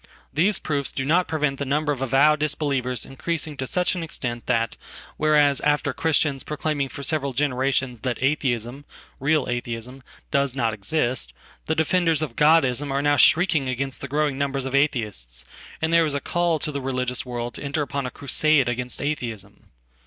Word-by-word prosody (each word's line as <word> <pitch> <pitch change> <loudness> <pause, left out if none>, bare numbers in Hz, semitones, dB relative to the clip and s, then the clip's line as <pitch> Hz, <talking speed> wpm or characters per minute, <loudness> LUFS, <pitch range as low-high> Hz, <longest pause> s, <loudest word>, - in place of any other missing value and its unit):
Theseproofs 155 -4 +1
do 135 - -3
not 175 +5 +3
prevent 150 -4 -1
the - - -1
number 145 +2 0
of 135 -3 -3
avowed 140 +4 +4
disbelievers 140 -4 -1
increasingto 145 0 -3
such 180 +5 +1
an 180 - -3
extent 120 -7 -5
that, 115 0 +1 0.4
whereas 150 -3 +3
after 150 0 +1
Christians 150 -4 +1
proclaiming 150 -1 -2
forseveral 140 -1 -2
generations 130 -2 0
that 125 +2 -2
Atheism 130 -2 -1 0.2
— - - -26
real 155 -3 +3
Atheism 120 +1 -4 0.2
— - - -31
does 140 -2 +1
not 115 -4 0
exist, 120 - -1 0.3
the 160 - +1
defenders 160 -1 +2
of 130 -7 -5
godism 145 -3 +4
are 140 +1 0
now 145 0 +4
shrieking 155 -3 +4
against 135 +1 -3
the - - -4
growingnumber 140 -2 0
of 135 - -4
Atheists, 105 - 0 0.4
and 160 +1 +1
there 170 0 +6
is 150 -2 -1
a - - 0
call 175 +3 0
to 150 +1 -3
the 140 -1 -4
religious 130 -1 -1
world 120 -1 -4
toenter 145 +2 -2
upon 140 -1 -3
a - - -3
crusade 140 +1 +2
against 125 +2 -2
Atheism. 115 -9 -5
140 Hz, 165 wpm, -24 LUFS, 125-150 Hz, 0.4 s, there